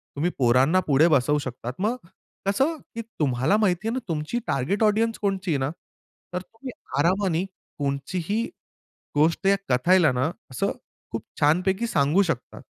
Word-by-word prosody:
तुम्ही 160 +5 0
पोरांना 130 +7 +4
पुढे 150 +4 +5
बसवू 145 0 +3
शकतात 125 -2 -5
मग 215 +5 +1 0.5
कसं, 270 +11 +2 0.2
की 230 - -3 0.2
तुम्हाला 135 +6 +2
माहिती 210 -1 +1
आहे 225 - 0
ना 260 - -1
तुमची 160 +8 -2
टार्गेट 185 - 0
ऑडियन्स 220 +2 +2
कोणची 195 -3 -1
आहे 145 - +2
ना. 135 +1 -1 0.6
तर 180 - -2
तुम्ही 225 +7 -10 0.3
आरामानी 180 +1 +2 0.3
कोणचीही 160 +9 -1 0.7
गोष्ट 160 +5 +2
या 200 0 +5
कथाला 165 +5 +4
ना, 130 +5 0 0.2
असं 130 - -1 0.4
खूप - - -3 0.2
छानपैकी 185 +8 +2
सांगू 155 -1 +3
शकता. 165 -10 -3
170 Hz, 145 wpm, -25 LUFS, 140-200 Hz, 0.7 s, पुढे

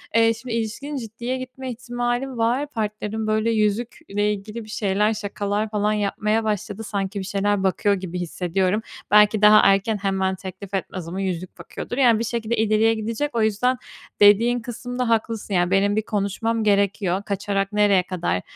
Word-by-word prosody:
eee, 225 0 +5
şimdi 240 +1 -7
ilişkinin 230 +6 -3
ciddiye 235 +2 -4
gitme 255 0 -6
ihtimali 245 +2 -2
var, 240 +6 +1
partnerim 215 -3 -3
böyle 215 +1 +1
yüzükle 210 -1 0
ilgili 215 +3 -7
bir 215 - -14
şeyler, 210 0 +1
şakalar 205 0 -2
falan 210 0 0
yapmaya 210 +2 0
başladı, 210 0 -3
sanki 200 -1 -3
bir 190 - -5
şeyler 200 0 0
bakıyor 200 +2 +2
gibi 180 -2 -5
hissediyorum. 180 +3 -1 0.3
Belki 210 0 +5
daha 210 0 +8
erken 195 +2 +3
hemen 190 -1 0
teklif 190 +1 -9
etmez 185 -2 -4
ama 185 +3 -4
yüzük 185 -1 -4
bakıyordur 245 - -7
yani 240 -5 +5
bir - - -1
şekilde 230 0 -2
ileriye 220 +1 +3
gidecek, 230 +6 -3
o 230 - +2
yüzden 220 +4 +1 0.4
dediğin 225 +4 +5
kısımda 245 +1 -4
haklısın 225 -2 -1
yani 175 0 +2
benim 200 +1 +3
bir 215 - +2
konuşmam 220 +2 -1
gerekiyor, 200 -2 +1
kaçarak 200 0 -2
nereye 205 -3 +4
kadar, 165 - -2
210 Hz, 160 wpm, -23 LUFS, 195-230 Hz, 0.4 s, daha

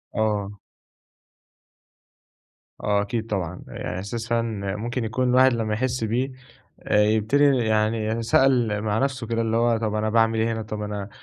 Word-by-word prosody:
آه. 105 -2 -1 2.2
آه، 100 -1 +1
أكيد 110 +2 -3
طبعًا، 95 -7 -3
يعني - - -5
إحساس 115 +4 -5
فعلًا 110 -4 -1
ممكن 120 +3 -3
يكون 125 +3 0
الواحد 130 +1 +5
لما 110 -2 -1
يحس 125 +2 -1
بيه، 125 +5 -1 0.6
يبتدي 110 +6 +3
يعني 110 0 0
سأل 115 -3 +3
مع 110 0 0
نفسه 130 -3 -1
كده 115 0 0
اللي 115 0 0
هو 120 0 +2
طب 110 -1 -2
أنا 110 0 0
باعمل 115 0 +2
إيه 115 +1 +1
هنا؟ 110 - -3
طب 110 -1 -6
أنا 105 -1 -5
110 Hz, 150 wpm, -24 LUFS, 105-115 Hz, 2.2 s, الواحد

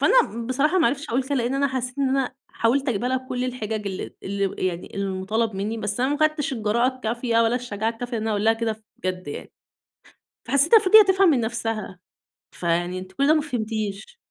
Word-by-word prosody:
فأنا 235 - +3
بصراحة 285 +8 +2
ما 320 - +4
عرفتش 280 +5 -2
أقول 250 +3 +1
كده 280 +2 -3
لإن 245 0 0
أنا 280 +1 +2
حسّيت 255 0 -4
إن 275 - +2
أنا 265 -1 0
حاولت 265 +4 +1
أجيبها 240 +1 0
لها 260 - +1
بكل 255 -1 -3
الحِجَج 220 -4 -3
ال 190 -2 -5
اللي 195 -1 -2
يعني 175 -1 -5
المُطالب 200 +3 -1
منّي، 210 +4 -2
بس 210 +2 -3
أنا 260 - +2
ما 290 - 0
أخدتش 310 -1 +1
الجراءة 235 +2 +1
الكافية 235 -1 -1
ولا 230 +1 +2
الشجاعة 225 -3 -2
الكافية 245 +2 -7
لإن 220 - -3
أنا 220 - -1
أقول 205 -1 0
لها 225 - +5
كده 225 -1 -3
بجد 185 -3 -4
يعني. - - -7 1.0
فحسّيتها 280 - +5
المفروض 430 +1 +7
تفهم 380 -1 +4
من 275 - +3
نفسها، 225 -4 -3 0.5
فيعني 175 +1 -1
أنتِ 185 0 -10
كل 275 +8 +1
ده 310 - +6
ما 310 - +3
فهمتيش. 220 - -4
235 Hz, 200 wpm, -24 LUFS, 210-270 Hz, 1.0 s, المفروض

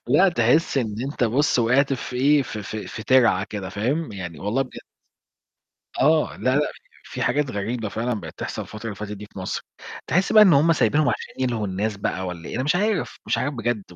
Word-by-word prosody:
لأ 195 +1 +5
تحس 140 +1 +2
إن 110 -4 -2
أنت 135 -2 -1
بُصّ 130 +5 +2
وقعت 130 +4 +3
في 125 -1 -4
إيه، 140 +2 +4
ف 115 - -7
ف 105 +1 -6
في 110 +1 -6
تِرعة 115 -6 +4
كده، 100 -3 -5
فاهم؟ 125 - -2
يعني 85 -4 -7
والله 115 +7 0
بجد. 130 - -10 1.2
آه، 155 0 +3
لا، 130 +2 +1
لأ، - - +4 0.4
ف - - -14
في - - -2
حاجات 145 0 +1
غريبة 110 +2 -3
فعلًا 120 +4 -2
بقِت 80 -3 -10
تحصل - - -4
الفترة 110 +1 -10
اللي 110 - -3
فاتت 105 0 -6
دي 105 +1 -9
في 100 - -13
مصر، 95 - -3 0.4
تحس 180 +4 +1
بقى 215 -1 +9
إن 190 - +7
هم 155 +3 +5
سايبينهم 155 -1 +2
عشان 115 - -3
يلهوا 120 -5 -1
الناس 100 +3 -2
بقى 95 -1 -2
والَّا 85 -2 -6
إيه؟ - - -6
أنا 130 - 0
مش 150 +5 +2
عارف، 210 -1 -1
مش - - +1
عارف 145 +2 -1
بجد، 120 -3 -1
120 Hz, 215 wpm, -23 LUFS, 105-145 Hz, 1.2 s, بقى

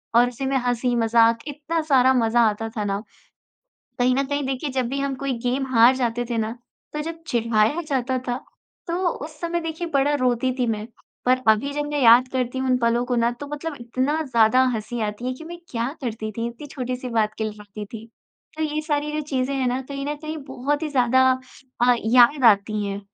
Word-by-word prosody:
और 240 +1 +6
उसी 250 +2 -5
में 270 0 +1
हँसी-मज़ाक, 230 -1 +3
इतना 305 +3 -2
सारा 260 0 +6
मज़ा 235 -1 +3
आता 225 +2 -4
था 210 - 0
ना। 200 +1 -1 1.0
कहीं 250 +1 +3
न 275 +1 +1
कहीं 285 0 -2
देखिए 270 +2 -2
जब 255 -2 -1
भी 275 +2 -3
हम 275 -1 -1
कोई 275 -1 -1
गेम 260 +2 0
हार 235 +3 +7
जाते 240 -1 -1
थे 235 - 0
ना, 220 +1 -1 0.4
तो 300 - -3
जब 330 +1 -7
चिढ़ाया 230 +4 +1
जाता 260 -1 0
था, 245 - 0 0.5
तो 340 - -2
उस 305 -1 -6
समय 340 0 -1
देखिए 325 +1 -4
बड़ा 280 +2 +3
रोती 255 +1 +1
थी 245 - +1
मैं। 215 -1 -2 0.4
पर 255 0 +4
अभी 255 +7 +3
जब 295 0 -2
मैं 290 - 0
याद 240 +2 +7
करती 255 0 -1
हूँ 260 0 -1
उन 255 - +4
पलों 235 +1 +1
को 250 -1 0
ना, 235 0 +2
तो 265 +4 -8
मतलब 295 +1 -5
इतना 260 +6 -1
ज़्यादा 250 -2 +4
हँसी 225 +2 -4
आती 210 +4 -3
है 255 - -1
कि 320 - -11
मैं 345 +1 -8
क्या 235 0 -1
करती 220 -2 -3
थी, 230 +2 -3
इतनी 240 +5 -10
छोटी-सी 255 -2 -5
बात 215 -2 +1
के 220 - -1
लिए 215 - -3
रोती 210 0 -8
थी। 225 +1 -9 0.5
तो 315 - -2
ये 305 0 -1
सारी 300 -1 -1
जो 305 - -1
चीज़ें 265 0 -1
हैं 260 -1 0
ना, 255 +2 -1
कहीं 275 +1 -6
न 295 - -1
कहीं 310 +1 -6
बहुत 280 +4 -2
ही 310 - -1
ज़्यादा 260 -1 +4 0.6
अ, 245 - +6
याद 245 +4 +5
आती 210 -1 +4
हैं। 200 0 -4
255 Hz, 215 wpm, -23 LUFS, 230-280 Hz, 1.0 s, हार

